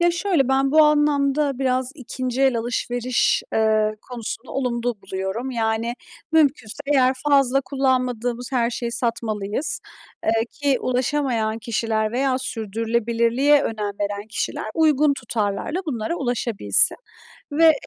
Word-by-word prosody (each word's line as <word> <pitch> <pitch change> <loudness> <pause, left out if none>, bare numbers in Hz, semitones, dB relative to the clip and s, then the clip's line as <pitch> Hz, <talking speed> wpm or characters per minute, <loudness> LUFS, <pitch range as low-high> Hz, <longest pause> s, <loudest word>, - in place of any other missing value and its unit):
Ya, 345 0 +4
şöyle, 340 -6 +1
ben 270 0 +2
bu 310 0 +7
anlamda 290 -2 +2
biraz 260 0 0
2. 255 -1 -3
el 265 -3 +3
alışveriş, 245 +1 0
eee, 215 -1 +2 0.2
konusunda 235 0 -6
olumlu 245 -2 -1
buluyorum. 190 +7 -4
Yani, 230 0 -1 0.4
mümkünse 285 -8 +2
eğer 265 -2 +3 0.2
fazla 275 -1 +4
kullanmadığımız 255 -2 -1
her 240 -1 +1
şeyi 235 0 -3
satmalıyız, 230 0 -2 0.4
eee, - - +3 0.2
ki 280 -3 0
ulaşamayan 250 -4 0
kişiler 220 -1 -1
veya 260 +1 +1
sürdürülebilirliğe 235 +4 +1
önem 210 -2 -2
veren 205 +1 -3
kişiler 220 - -3
uygun 300 -2 +3
tutarlarla 220 - -2
bunlara 265 +4 -2
ulaşabilsin 235 - +3 0.6
ve 320 +2 +6
245 Hz, 120 wpm, -22 LUFS, 225-275 Hz, 0.6 s, bu